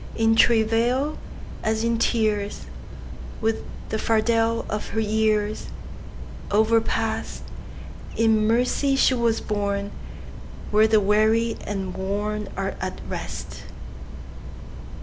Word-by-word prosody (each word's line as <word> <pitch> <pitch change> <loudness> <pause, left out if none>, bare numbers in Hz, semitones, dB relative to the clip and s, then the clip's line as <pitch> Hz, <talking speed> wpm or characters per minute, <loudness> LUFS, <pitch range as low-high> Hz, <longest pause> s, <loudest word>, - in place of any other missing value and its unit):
In 225 0 +3
travail, 235 +6 +2 0.4
as 220 +1 0
in 230 0 +1
tears, 215 -3 0 0.7
With 225 0 -1 0.3
the 220 - -2
fardel 225 +1 +1
of 210 0 -3
her - - +3
yearsOverpast, 220 +1 -1 0.8
In 220 -1 +3
mercy 250 +4 +2
she 270 - +4
was 235 -2 +1
borneWhere 205 +1 -2
the 215 - +5
weary 215 +3 +2
and 195 -2 -3
wornAre 200 0 -3
at - - -4
rest. - - -6
220 Hz, 90 wpm, -24 LUFS, 210-230 Hz, 0.8 s, the